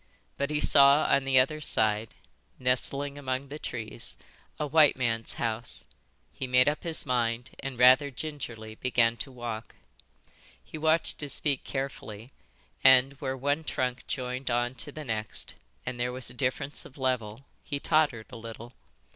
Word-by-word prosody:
But 140 +1 -1
he 150 -1 0
saw 140 0 +6
on 135 0 +3
the 135 -1 +3
other 155 +4 +1
side, 110 -4 +2 0.4
nestling 140 +3 -1
among 130 0 -3
the 150 +2 -7
trees, 110 - -4 0.4
a 150 - 0
white 150 0 +5
man's 115 -3 -1
house; 115 0 -2 0.5
he 130 - -5
made 125 +1 +5
up 150 +1 +1
his 165 -2 0
mind 120 -1 0
and, 135 -2 -5
rather 130 +3 +6
gingerly, 125 -6 -6
began 115 0 +2
to 110 +5 -5
walk. 120 -3 -6 0.9
He - - -11
watched 160 +1 +1
his 145 -2 -2
feet 140 -3 0
carefully, 130 -4 -5 0.5
and 130 +1 +7
where 135 -1 -2
one 145 +4 0
trunk 125 -4 -2
joined 130 0 -3
on 120 +1 0
to 130 +4 -7
the 155 +1 -8
next 110 -3 -2 0.3
and 125 -1 -4
there 125 +1 0
was 125 -1 -3
a - - -12
difference 135 +3 -2
of 135 - -14
level, 125 -2 -2 0.2
he 140 - -3
tottered 145 -8 +1
a - - -8
little. 115 +1 -9
130 Hz, 160 wpm, -28 LUFS, 120-140 Hz, 0.9 s, and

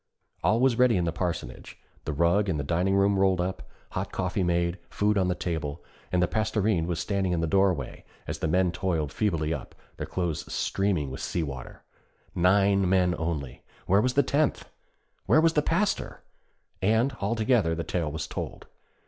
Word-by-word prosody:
All 110 +2 +3
was 125 -2 +3
ready 125 -4 +5
in 90 - +1
the 85 - 0
parsonage. 85 -7 -4 0.3
The - - -2
rug 85 +7 +2
in 85 - 0
the 70 - -2
dining 90 +6 +1
room 100 0 +3
rolled 95 -1 +3
up, 90 +1 -3 0.2
hot - - -3
coffee - - -1
made, 85 0 0
food 105 +1 +1
on 95 -2 +2
the 90 - 0
table; 80 -4 -4 0.3
and 90 -1 +2
the - - +2
Pastorinde 105 -4 0
was 85 -2 -2
standing 95 +1 0
in 85 - 0
the 85 - +1
doorway 90 -5 +1 0.2
as - - -5
the - - -1
men 90 +2 +2
toiled 85 -5 -2
feebly 80 -7 0
up, - - -7 0.2
their - - -4
clothes 85 -4 -3
streaming 95 -9 0
with 65 - -6
sea 85 - -2
water. 65 -4 -8 0.5
Nine 95 +1 +3
men 90 -2 +3
only! 75 -6 -3 0.2
Where 100 +3 +4
was 125 +1 0
the 140 - +5
tenth 145 +3 0 0.6
where - - +5
was 165 0 +4
the 150 - +3
Pastor? 185 +7 -1 0.6
And, 110 +6 +2
all 100 +4 0
together, 110 -7 +2
the 85 - -3
tale 80 -1 -2
was 80 0 -4
told. - - -6
90 Hz, 185 wpm, -27 LUFS, 85-105 Hz, 0.6 s, ready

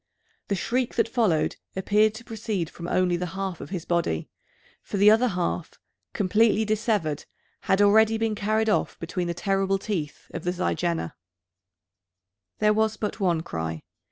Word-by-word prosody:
The 200 - 0
shriek 245 +6 -1
that - - +2
followed 220 -10 +1 0.2
appeared 210 +3 +3
to 230 - -9
proceed 215 -7 -3
from 170 - -7
only 180 -1 +2
the 180 +1 -3
half 190 -3 -3
of - - -8
his 180 -3 -4
body; 170 - -1 0.5
for - - -5
the 205 +2 +7
other 230 +3 +4
half, 180 -4 -2 0.4
completely 215 +2 +3
dissevered, 210 -8 0 0.3
had 190 - +1
been 205 - +5
already 220 +1 +4
carried 215 +2 0
off 210 - +1
between 175 +1 -3
the 170 - -2
terrible 195 +2 +1
teeth 185 -7 -4
of - - -5
the 180 - 0
zygaena. 175 - -1 1.4
There 210 0 +3
was 220 0 +1
but 210 +1 -3
one 175 -5 +2
cry. 80 - -4
195 Hz, 155 wpm, -26 LUFS, 175-215 Hz, 1.4 s, the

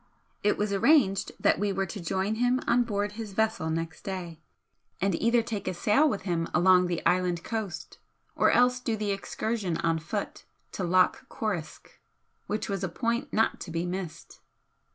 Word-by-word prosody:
It 205 - +2
was 205 -1 -1
arranged 220 -3 +3
that - - +3
we 205 0 +1
were 195 0 -1
to 195 +2 -7
join 190 +4 -1
him 245 +2 +2
on 245 - +3
board 205 -2 -1
his 215 -1 -7
vessel 220 -5 0
next 165 0 -3
day, 175 -4 -6 0.6
and 195 0 +1
either 230 +6 +2
take 215 -3 -5
a - - -1
sail 220 - +3
with 205 -7 -3
him 170 -3 -1
along 180 0 +5
the 175 -1 -3
island 180 -2 +1
coast 220 -6 -5 0.4
or - - +4
else 250 0 +4
do 230 -3 -2
the 210 -1 -1
excursion 195 -2 -2
on 165 -1 0
foot 200 +6 -5 0.3
to 190 - -4
Loch 185 +1 +2
Coruisk, 180 -9 -5 0.5
which 210 +1 -2
was 195 -2 -3
a 190 - -1
point 235 - -2
not 225 +1 +1
to - - -7
be 165 +1 -2
missed. 180 -2 -6
195 Hz, 175 wpm, -28 LUFS, 175-220 Hz, 0.6 s, along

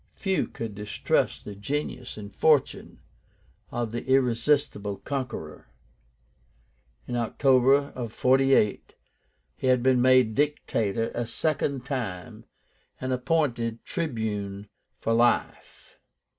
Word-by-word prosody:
Few 190 -2 0
could 115 -2 -6
distrust 105 +1 -1
the 105 - -6
genius 125 +3 -4
and 100 -2 -9
fortune 155 -4 +1 0.7
of 120 -2 -3
the 120 - -4
irresistible 125 -4 +1
conqueror. 115 - -5 1.4
In 120 - -3
October 135 +3 +3
of 120 -3 -5
48 130 -4 +2 0.6
he - - -3
had 125 -1 +3
been 130 -1 +4
made 130 -3 +5
Dictator 115 -6 0
a 120 -1 -3
second 140 0 -1
time, 115 -10 -5 0.5
and 130 0 -2
appointed 125 -4 -1
Tribune 105 - -3 0.3
for 115 - -1
life. 120 +1 0
125 Hz, 105 wpm, -26 LUFS, 110-135 Hz, 1.4 s, made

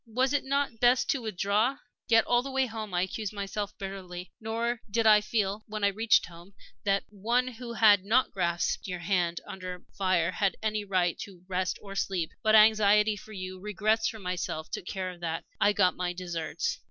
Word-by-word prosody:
Was 255 +4 +1
it 285 - +1
not 275 -4 -1
best 245 +1 +4
to 275 - -1
withdraw? 215 +4 0 0.3
Yet 225 -1 +5
all 240 0 +3
the 275 - -6
way 265 0 +1
home 220 -3 -6
I 175 0 +1
accused 210 +2 -4
myself 205 0 -4
bitterly. 185 -2 -7
Nor 230 +2 -2
did 225 +2 0
I 210 -1 +7
feel, 210 -1 -1
when 215 -1 -5
I 200 - +5
reached 220 +2 +3
home, 175 +3 -14 0.3
that 195 0 +1
one 235 +5 0
who 245 -1 -7
had 210 -4 +5
not 230 +6 +2
grasped 175 -1 -1
your 180 -1 -3
hand 175 -2 0
under 185 -1 -7
fire 185 -3 +1
had 195 +1 0
any 215 -1 0
right 185 -4 0
to 185 -3 -9
rest 185 0 -1
or 200 -1 -8
sleep. 190 -4 -1
But 220 0 +4
anxiety 210 -1 +5
for 215 +2 -12
you, 185 -1 -6
regrets 210 +3 0
for 220 - -4
myself, 180 -5 -4
took 180 - -5
care 185 -2 -3
of 175 - -13
that; 165 -1 -3
I 205 - +5
got 185 -3 +3
my 180 -1 -2
deserts. 175 -3 -3
200 Hz, 195 wpm, -29 LUFS, 185-220 Hz, 0.3 s, I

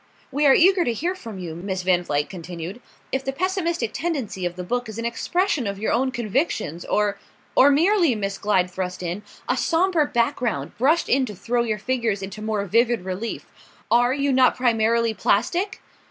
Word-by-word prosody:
"We 290 +2 +2
are 270 - +7
eager 370 +1 +5
to 240 - 0
hear 340 +10 -1
from 230 - -9
you," 175 -3 -6
Miss 185 +2 -4
Van 180 -1 +2
Vluyck 145 -3 -1
continued, 180 +4 -7 0.3
"if 265 0 -1
the 270 - -2
pessimistic 340 - -1
tendency 260 - -2
of 175 - -7
the 180 - -5
book 245 +4 -2
is 220 - -7
an 230 - -3
expression 310 - 0
of 200 0 -3
your 215 - -1
own 260 +3 +2
convictions 230 - -2
or 205 -1 0 0.2
" - - -34
"Or 275 - +7
merely," 335 - +3
Miss 195 -2 -3
Glyde 185 -3 +1
thrust 180 0 -4
in, 175 +3 -3 0.3
"a - - +2
sombre 335 -2 +2
background 230 - -1
brushed 310 +7 +3
in 260 0 +2
to 210 - -7
throw 240 +6 0
your 220 -3 -1
figures 225 -3 -1
into 200 +2 -7
more 215 -2 -1
vivid 230 0 +2
relief. 190 +5 -4 0.5
Are 245 +1 +4
you 280 0 +1
not 255 0 +4
primarily 230 -2 +2
plastic?" 345 - 0
230 Hz, 190 wpm, -23 LUFS, 195-275 Hz, 0.5 s, are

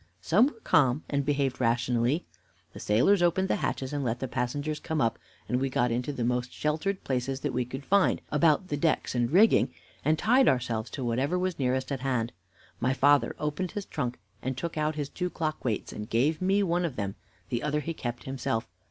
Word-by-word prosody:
Some 200 - +4
were 260 -6 -8
calm, 140 -1 +3
and 140 -1 +1
behaved 140 -2 0
rationally. 120 +5 +1 0.5
The - - -9
sailors 130 - +3
opened 180 +2 +2
the - - +2
hatches 130 +1 -2
and 145 -1 -1
let 120 -1 -1
the 130 - -3
passengers 145 +5 -2
come 160 -1 -2
up, 115 -4 +1 0.3
and 125 +1 0
we 135 - +1
got 125 -2 +1
into 125 +4 -1
the 130 -4 -3
most 125 +1 0
sheltered 160 +6 -1
places 130 +1 -2
that 145 -3 -2
we 125 0 0
could 135 +3 -7
find 200 -1 +3
about 155 +4 +3
the 145 - -1
decks 155 +1 +1
and 120 -1 +1
rigging, 205 +8 +5 0.3
and 155 +2 +2
tied 250 +7 +4
ourselves 120 -3 +1
to 130 - -5
whatever 130 +9 0
was 180 -2 -1
nearest 130 +1 0
at 135 - -1
hand. 125 -3 -1 0.5
My 130 +2 +1
father 145 -4 +4
opened 150 +4 -2
his 205 -2 -4
trunk 125 -4 -3 0.2
and 130 0 -3
took 170 +5 -4
out 155 0 0
his 145 -2 -2
two 180 +4 -3
clock 155 -3 -3
weights, 115 -5 -2
and 105 +2 -6
gave 145 +9 +1
me 195 +2 +3
one 175 -1 +1
of 160 -7 -2
them; 100 -3 -3 0.4
the 120 -1 -1
other 150 0 0
he 165 +2 -3
kept 120 -5 -5
himself. 120 -4 -2
140 Hz, 210 wpm, -28 LUFS, 125-160 Hz, 0.5 s, rigging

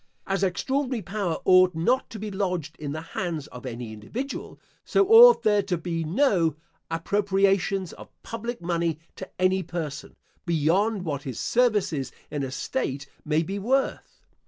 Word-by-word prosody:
As 195 0 -1
extraordinary 255 +5 -1
power 195 -3 -2
ought 185 -2 +6
not 240 +12 +1
to 225 - -8
be 210 0 -5
lodged 180 -6 -2
in 145 -2 -4
the 155 +2 -4
hands 170 -6 -3
of 125 +1 -9
any 120 -2 -6
individual, 235 - -6 0.2
so 395 - +2
ought 470 +3 +9
there 210 -1 +4
to 190 -3 -2
be 165 0 -3
no 170 - +2 0.3
appropriations 195 +1 +1
of - - -12
public 230 -2 -5
money 170 -2 0 0.2
to - - -8
any 185 +1 +3
person, 160 -4 -6 0.3
beyond 180 +5 +1
what 145 -4 -2
his 130 -5 -6
services 210 - +1 0.2
in 145 - -2
a 135 - -2
state 140 - -3 0.2
may 155 +2 +1
be 195 +4 -4
worth. 265 +7 -1
185 Hz, 155 wpm, -26 LUFS, 160-210 Hz, 0.3 s, ought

